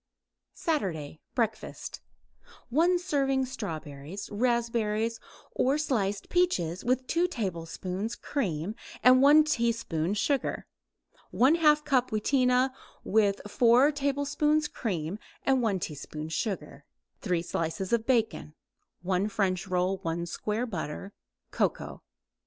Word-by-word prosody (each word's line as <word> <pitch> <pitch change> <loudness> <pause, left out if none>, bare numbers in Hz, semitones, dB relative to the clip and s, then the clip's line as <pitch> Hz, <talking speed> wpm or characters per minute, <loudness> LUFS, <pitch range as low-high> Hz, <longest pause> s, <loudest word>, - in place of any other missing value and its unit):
SATURDAY 165 - -2 0.2
BREAKFAST 225 -3 -3 0.7
1 335 +8 +3
serving 275 -7 +1
strawberries, 165 - -6
raspberries 230 -1 0 0.3
or 270 +3 +2
sliced 210 -10 -1
peaches 185 - +1
with 255 +1 +1
2 340 +6 +1
tablespoons 190 - -4
cream 190 - -2 0.3
and 255 +1 +7
1 295 +3 +7
teaspoon 230 - 0
sugar; 275 +6 0 0.7
1/2 300 +2 +4
cup 260 -4 +2
wheatena 250 +3 +2 0.3
with 200 -1 +2
4 245 +6 +5
tablespoons 285 +2 +1
cream 180 -3 -3 0.2
and 265 -1 +3
1 210 -5 +1
teaspoon 155 -1 -6
sugar; 195 +4 -3 0.4
3 180 -4 0
slices 175 +4 -2
bacon; 225 - 0 0.5
1 190 +3 0
French 195 -3 0
roll; 185 +1 0
1 170 -1 -2
square 210 +6 -2
butter; 190 -2 -5 0.4
cocoa. - - -1
225 Hz, 100 wpm, -28 LUFS, 185-270 Hz, 0.7 s, and